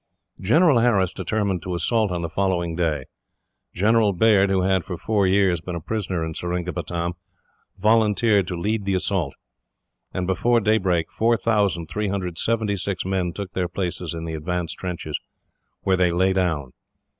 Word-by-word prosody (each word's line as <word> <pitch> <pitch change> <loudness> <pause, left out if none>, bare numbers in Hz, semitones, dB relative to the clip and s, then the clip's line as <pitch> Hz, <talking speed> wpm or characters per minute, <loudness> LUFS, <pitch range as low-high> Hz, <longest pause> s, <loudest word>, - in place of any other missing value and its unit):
General 145 - +4
Harris 100 -7 +2
determined 100 -1 -1
to 90 0 -4
assault 110 +5 +1
on 90 -1 -3
the - - -1
following 85 -2 0
day. 80 -6 -1 0.7
General 105 +2 +3
Baird, 100 0 +4
who 95 -1 +2
had, 95 -1 +2
for 90 - -6
four 105 +1 +1
years, 95 -3 +3
been 90 +1 -5
a - - -3
prisoner 95 -2 -2
in 80 - -5
Seringapatam, 85 0 -3 0.6
volunteered 105 -1 +3
to 90 - -3
lead 105 +2 -1
the 100 -1 +1
assault; 90 -6 -1 0.8
and 90 - -2
before 115 +6 +2
daybreak 95 -6 +1
4,376 100 -2 0
men 95 -2 -1
took 100 +2 -7
their 90 -1 -1
places 90 -2 -4
in 80 0 -5
the 80 - -4
advance 85 +1 -3
trenches, 85 -5 -4 0.6
where 95 -1 +2
they 90 -1 +3
lay 95 +2 +2
down. 80 -8 -1
95 Hz, 145 wpm, -23 LUFS, 85-105 Hz, 0.8 s, General